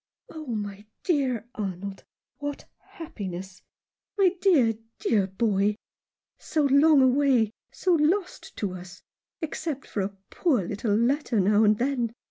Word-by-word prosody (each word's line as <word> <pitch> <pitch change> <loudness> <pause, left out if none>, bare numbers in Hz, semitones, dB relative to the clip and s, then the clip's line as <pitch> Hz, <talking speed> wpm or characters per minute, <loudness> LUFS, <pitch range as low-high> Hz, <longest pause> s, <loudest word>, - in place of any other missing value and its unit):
"Oh, 310 -2 -8
my 205 -3 -5 0.2
dear 265 - 0
Arnold, 195 -1 -5 0.3
what 290 -1 -5
happiness! 190 - -8 0.6
My 385 -3 +5
dear, 280 - +4 0.2
dear 200 -4 +1
boy! 205 0 +1 0.6
So 310 - 0
long 280 +1 +6
away 260 -4 +3
— - - -68
so 365 - +1
lost 345 +5 0
to 200 -4 -2
us 185 0 -10 0.2
— - - -67
except 305 -3 -4
for 205 - -3
a 195 +1 -4
poor 275 - +1
little 205 +3 -1
letter 245 +1 +1
now 205 +3 +4
and 210 0 +4
then. 245 -2 -1
230 Hz, 135 wpm, -26 LUFS, 200-290 Hz, 0.6 s, long